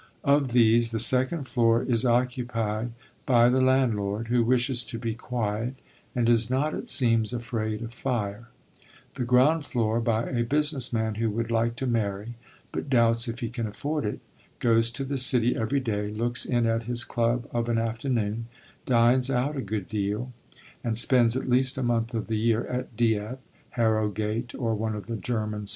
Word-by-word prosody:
Of 140 Hz, 0 st, +3 dB
these 115 Hz, -1 st, +4 dB
the 115 Hz, -, -2 dB
second 130 Hz, +7 st, +4 dB
floor 115 Hz, -1 st, +2 dB
is 125 Hz, -1 st, 0 dB
occupied 120 Hz, -2 st, -1 dB, 0.3 s
by 120 Hz, -2 st, +5 dB
the 130 Hz, +1 st, +2 dB
landlord, 115 Hz, -5 st, +1 dB
who 120 Hz, -1 st, +3 dB
wishes 125 Hz, +1 st, +1 dB
to 115 Hz, -, -6 dB
be 115 Hz, 0 st, -3 dB
quiet, 115 Hz, +1 st, -3 dB, 0.4 s
and 120 Hz, -2 st, +1 dB
is 115 Hz, -1 st, +3 dB
not, 140 Hz, +4 st, 0 dB
it -, -, -6 dB
seems, 115 Hz, -3 st, +2 dB
afraid 115 Hz, -2 st, -3 dB
of 115 Hz, 0 st, -7 dB
fire; 115 Hz, -4 st, -3 dB, 0.7 s
the 125 Hz, -, -3 dB
ground 130 Hz, +6 st, +3 dB
floor 115 Hz, -5 st, 0 dB
by 115 Hz, -1 st, 0 dB
a 120 Hz, -2 st, -1 dB
business 145 Hz, 0 st, +1 dB
man 110 Hz, -2 st, -1 dB
who 115 Hz, -, +1 dB
would 115 Hz, +2 st, -3 dB
like 115 Hz, 0 st, +1 dB
to 130 Hz, -, -3 dB
marry, 110 Hz, -2 st, -2 dB, 0.4 s
but -, -, -5 dB
doubts 115 Hz, -2 st, +3 dB
if 115 Hz, +2 st, -5 dB
he 115 Hz, -, -2 dB
can 120 Hz, -2 st, -4 dB
afford 145 Hz, +8 st, -3 dB
it, 105 Hz, -, -3 dB, 0.4 s
goes 115 Hz, -1 st, +2 dB
to 120 Hz, +4 st, -5 dB
the 135 Hz, 0 st, -2 dB
city 125 Hz, -1 st, +4 dB
every 115 Hz, +5 st, 0 dB
day, 105 Hz, -5 st, -2 dB
looks 120 Hz, +3 st, -2 dB
in 120 Hz, -2 st, +1 dB
at 115 Hz, 0 st, 0 dB
his 120 Hz, 0 st, +3 dB
club 120 Hz, +1 st, -1 dB
of 120 Hz, 0 st, -2 dB
an 115 Hz, -, +1 dB
afternoon, 115 Hz, -1 st, -2 dB, 0.4 s
dines 125 Hz, +1 st, +3 dB
out 135 Hz, +3 st, 0 dB
a 135 Hz, -, -2 dB
good 100 Hz, -3 st, -4 dB
deal, 105 Hz, +4 st, -3 dB, 0.5 s
and 115 Hz, -2 st, -1 dB
spends 120 Hz, 0 st, +4 dB
at 130 Hz, -, -4 dB
least 130 Hz, +1 st, +2 dB
a 135 Hz, -, -1 dB
month 115 Hz, 0 st, -1 dB
of 110 Hz, -, -2 dB
the 110 Hz, -1 st, -2 dB
year 115 Hz, +1 st, +1 dB
at 125 Hz, -2 st, -5 dB
Dieppe, 110 Hz, +1 st, 0 dB, 0.4 s
Harrogate, 110 Hz, +1 st, -1 dB
or 115 Hz, -3 st, -1 dB
one 110 Hz, 0 st, -2 dB
of 105 Hz, -, -7 dB
the 115 Hz, -, -4 dB
German 105 Hz, -1 st, -3 dB
spas. -, -, -2 dB
115 Hz, 185 wpm, -26 LUFS, 110-125 Hz, 0.7 s, by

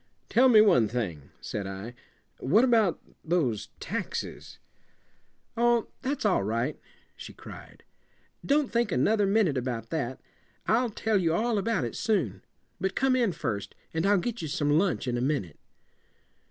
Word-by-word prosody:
"Tell 260 Hz, +2 st, +5 dB
me 220 Hz, -3 st, +8 dB
one 175 Hz, -, +5 dB
thing," 95 Hz, -, -4 dB
said 100 Hz, -2 st, -4 dB
I. 95 Hz, +5 st, -7 dB, 0.5 s
"What 195 Hz, -, +4 dB
about 225 Hz, -8 st, +3 dB, 0.2 s
those 155 Hz, -, 0 dB
taxes?" -, -, -5 dB, 1.0 s
"Oh, 235 Hz, -1 st, +2 dB
that's 270 Hz, -1 st, -2 dB
all 195 Hz, -, +3 dB
right," 115 Hz, +8 st, -2 dB, 0.4 s
she -, -, -10 dB
cried. -, -, -12 dB, 0.6 s
"Don't 285 Hz, -1 st, +1 dB
think 235 Hz, -3 st, +1 dB
another 205 Hz, -, +2 dB
minute 195 Hz, -10 st, +2 dB
about 120 Hz, -2 st, -4 dB
that. 135 Hz, -6 st, -2 dB, 0.5 s
I'll 235 Hz, +2 st, +2 dB
tell 215 Hz, -1 st, 0 dB
you 165 Hz, -2 st, +1 dB
all 225 Hz, +1 st, +1 dB
about 210 Hz, -, 0 dB
it 120 Hz, -, -4 dB
soon. 195 Hz, -, 0 dB, 0.4 s
But 190 Hz, +1 st, -2 dB
come 265 Hz, 0 st, +2 dB
in 235 Hz, -6 st, +2 dB
first, 120 Hz, -, -4 dB, 0.2 s
and 160 Hz, +4 st, 0 dB
I'll 205 Hz, 0 st, +5 dB
get 230 Hz, +4 st, -3 dB
you 160 Hz, -, -3 dB
some 145 Hz, 0 st, +1 dB
lunch 180 Hz, -7 st, 0 dB
in 120 Hz, -1 st, 0 dB
a -, -, -1 dB
minute." 125 Hz, -, -2 dB
175 Hz, 155 wpm, -28 LUFS, -, 1.0 s, me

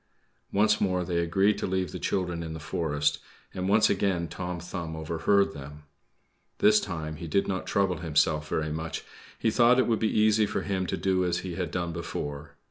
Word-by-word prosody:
Once 105 Hz, +1 st, +3 dB
more 90 Hz, -3 st, +1 dB
they 85 Hz, -1 st, 0 dB
agreed 95 Hz, +5 st, +2 dB
to -, -, -2 dB
leave 95 Hz, -1 st, -1 dB
the -, -, -6 dB
children 90 Hz, -3 st, -1 dB
in 80 Hz, -1 st, -5 dB
the 80 Hz, -, -6 dB
forest, 75 Hz, -2 st, -1 dB, 0.3 s
and 95 Hz, +1 st, -2 dB
once 105 Hz, +2 st, +5 dB
again 95 Hz, -4 st, 0 dB
Tom 90 Hz, 0 st, -5 dB
Thumb 85 Hz, -2 st, -5 dB
overheard 80 Hz, +5 st, +1 dB
them. 75 Hz, +1 st, -10 dB, 0.7 s
This 105 Hz, 0 st, +5 dB
time 80 Hz, -5 st, -5 dB
he 85 Hz, -, -7 dB
did 100 Hz, +5 st, +1 dB
not 95 Hz, -1 st, -3 dB
trouble 95 Hz, -3 st, +1 dB
himself 75 Hz, -1 st, +1 dB
very 80 Hz, -1 st, -1 dB
much; 80 Hz, +1 st, -4 dB, 0.3 s
he 110 Hz, -, +1 dB
thought 120 Hz, +2 st, +5 dB
it 130 Hz, -, +4 dB
would 115 Hz, -2 st, +1 dB
be 110 Hz, -, +1 dB
easy 110 Hz, 0 st, +4 dB
for -, -, -2 dB
him 95 Hz, -2 st, -1 dB
to -, -, -2 dB
do 95 Hz, -1 st, +1 dB
as 90 Hz, -1 st, 0 dB
he 90 Hz, -, -4 dB
had 90 Hz, -1 st, -3 dB
done 85 Hz, -1 st, -2 dB
before. 75 Hz, -3 st, -5 dB
90 Hz, 200 wpm, -28 LUFS, 80-100 Hz, 0.7 s, once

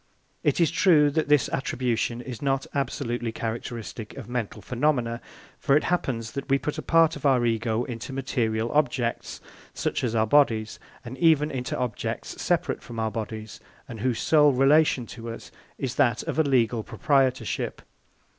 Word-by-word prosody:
It 145 Hz, -, +1 dB
is 165 Hz, -3 st, +3 dB
true 160 Hz, -4 st, +4 dB
that 155 Hz, +2 st, 0 dB
this 150 Hz, -3 st, +4 dB
attribution 120 Hz, -3 st, -1 dB
is 125 Hz, -2 st, -8 dB
not 135 Hz, -1 st, 0 dB
absolutely 120 Hz, -4 st, -2 dB
characteristic 115 Hz, -1 st, -6 dB
of 130 Hz, -6 st, -8 dB
mental 120 Hz, -4 st, -3 dB
phenomena, 120 Hz, +1 st, 0 dB, 0.4 s
for 140 Hz, -, +3 dB
it -, -, 0 dB
happens 120 Hz, -10 st, -1 dB
that 140 Hz, 0 st, -6 dB
we 135 Hz, -, +4 dB
put 150 Hz, +2 st, -4 dB
a -, -, -3 dB
part 165 Hz, -1 st, +3 dB
of -, -, -10 dB
our 130 Hz, -4 st, +3 dB
Ego 115 Hz, 0 st, 0 dB
into 120 Hz, +1 st, -6 dB
material 120 Hz, -4 st, -1 dB
objects, 135 Hz, -5 st, -1 dB, 0.3 s
such -, -, -2 dB
as 115 Hz, -2 st, -1 dB
our 110 Hz, -1 st, +3 dB
bodies, 110 Hz, -4 st, +2 dB, 0.3 s
and 125 Hz, +2 st, -8 dB
even 155 Hz, -3 st, +4 dB
into 125 Hz, -2 st, -3 dB
objects 125 Hz, -4 st, -4 dB
separate -, -, 0 dB
from 115 Hz, -1 st, -8 dB
our 110 Hz, 0 st, -1 dB
bodies, 110 Hz, -1 st, -6 dB, 0.3 s
and 115 Hz, -, -8 dB
whose 125 Hz, +1 st, 0 dB
sole 150 Hz, -3 st, +4 dB
relation 135 Hz, -1 st, +4 dB
to 115 Hz, 0 st, -8 dB
us 115 Hz, -, -9 dB, 0.3 s
is 130 Hz, -4 st, -3 dB
that 120 Hz, -5 st, +2 dB
of -, -, -3 dB
a -, -, +5 dB
legal 120 Hz, -5 st, +2 dB
proprietorship. 130 Hz, -1 st, 0 dB
125 Hz, 165 wpm, -26 LUFS, 115-140 Hz, 0.4 s, a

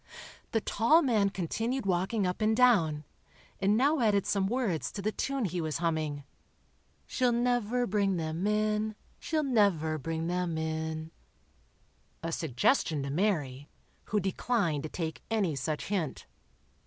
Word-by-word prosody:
The 225 Hz, -, +1 dB
tall 270 Hz, +13 st, +3 dB
man 215 Hz, -7 st, +3 dB
continued 225 Hz, +7 st, -2 dB
walking 190 Hz, +3 st, +1 dB
up 180 Hz, +3 st, -2 dB
and 220 Hz, +1 st, +2 dB
down, 170 Hz, -12 st, +4 dB, 0.6 s
and 200 Hz, +2 st, +3 dB
now 285 Hz, +5 st, +3 dB
added 205 Hz, -4 st, +2 dB
some 200 Hz, -2 st, +1 dB
words 220 Hz, -8 st, -1 dB
to -, -, -6 dB
the 215 Hz, -, +1 dB
tune 270 Hz, +1 st, -2 dB
he 180 Hz, -1 st, -2 dB
was 155 Hz, -2 st, -2 dB
humming: 155 Hz, -4 st, -1 dB, 0.8 s
"She'll 250 Hz, -2 st, +1 dB
never 245 Hz, 0 st, +1 dB
bring 200 Hz, -3 st, +1 dB
them 165 Hz, +4 st, -2 dB
in—she'll 215 Hz, +8 st, -1 dB
never 195 Hz, -, +2 dB
bring 160 Hz, +3 st, -3 dB
them 175 Hz, -1 st, -1 dB
in,"—a 160 Hz, -, -7 dB
suggestion 155 Hz, -, +1 dB
to 140 Hz, -, -3 dB
Mary, 145 Hz, -6 st, -1 dB, 0.4 s
who 210 Hz, -, 0 dB
declined 190 Hz, -, 0 dB
to 155 Hz, -, -5 dB
take 160 Hz, -2 st, -4 dB
any 200 Hz, -9 st, +1 dB
such 150 Hz, +3 st, -3 dB
hint. 180 Hz, -8 st, -2 dB
195 Hz, 135 wpm, -30 LUFS, 160-220 Hz, 0.8 s, down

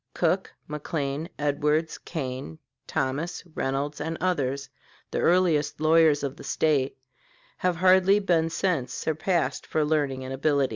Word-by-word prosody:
Cook, -, -, +1 dB, 0.2 s
McLean, 150 Hz, +1 st, -3 dB
Edwards, 150 Hz, +2 st, 0 dB
Kane, 130 Hz, -, -5 dB, 0.3 s
Thomas, 145 Hz, +6 st, -2 dB
Reynolds, 140 Hz, +2 st, -2 dB
and 165 Hz, 0 st, -3 dB
others, 140 Hz, -6 st, -1 dB, 0.4 s
the -, -, -1 dB
earliest 165 Hz, -5 st, +2 dB
lawyers 155 Hz, -2 st, +4 dB
of 140 Hz, +1 st, -3 dB
the -, -, -10 dB
State, 145 Hz, -4 st, +1 dB, 0.6 s
have 180 Hz, -1 st, +1 dB
hardly 185 Hz, +3 st, +5 dB
been 170 Hz, -5 st, +2 dB
since 165 Hz, -8 st, -1 dB
surpassed 160 Hz, +2 st, -1 dB
for 155 Hz, -1 st, +1 dB
learning 145 Hz, -4 st, 0 dB
and 130 Hz, -, -5 dB
ability. 140 Hz, 0 st, +2 dB
150 Hz, 130 wpm, -26 LUFS, 140-165 Hz, 0.6 s, hardly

